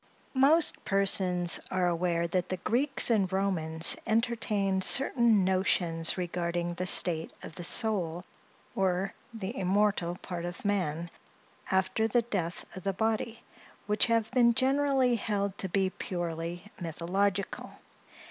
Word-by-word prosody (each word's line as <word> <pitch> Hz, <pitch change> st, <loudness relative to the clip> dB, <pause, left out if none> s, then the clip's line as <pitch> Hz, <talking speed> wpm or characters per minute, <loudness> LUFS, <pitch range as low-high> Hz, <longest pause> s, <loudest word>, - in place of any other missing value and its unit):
MOST 295 Hz, +5 st, +3 dB
persons 185 Hz, -3 st, +3 dB
are 185 Hz, -1 st, 0 dB
aware 170 Hz, 0 st, 0 dB
that 180 Hz, +1 st, -2 dB
the 185 Hz, -, -2 dB
Greeks 255 Hz, +7 st, +2 dB
and 200 Hz, -5 st, +1 dB
Romans 165 Hz, -4 st, +2 dB
entertained 215 Hz, -4 st, 0 dB
certain 235 Hz, -6 st, +4 dB
notions 185 Hz, -4 st, +1 dB
regarding 175 Hz, -1 st, -3 dB
the 180 Hz, +1 st, -4 dB
state 165 Hz, -3 st, 0 dB
of -, -, -9 dB
the 175 Hz, -, -8 dB
soul, 180 Hz, -3 st, +1 dB, 0.5 s
or 190 Hz, 0 st, -1 dB, 0.2 s
the 220 Hz, 0 st, -6 dB
immortal 190 Hz, -3 st, 0 dB
part 175 Hz, -2 st, -7 dB
of 175 Hz, +4 st, -7 dB
man, 170 Hz, -4 st, -2 dB, 0.6 s
after 190 Hz, +4 st, +1 dB
the 235 Hz, +2 st, +1 dB
death 180 Hz, -7 st, -4 dB
of 185 Hz, -, -7 dB
the 195 Hz, +1 st, -2 dB
body, 225 Hz, +2 st, -2 dB, 0.4 s
which 210 Hz, +3 st, +2 dB
have 230 Hz, -2 st, 0 dB
been 240 Hz, -2 st, +3 dB
generally 265 Hz, -2 st, +2 dB
held 200 Hz, -2 st, -2 dB
to 190 Hz, -, -4 dB
be 190 Hz, +1 st, 0 dB
purely 175 Hz, 0 st, -5 dB
mythological. 185 Hz, +4 st, -2 dB
190 Hz, 130 wpm, -29 LUFS, 175-220 Hz, 0.6 s, certain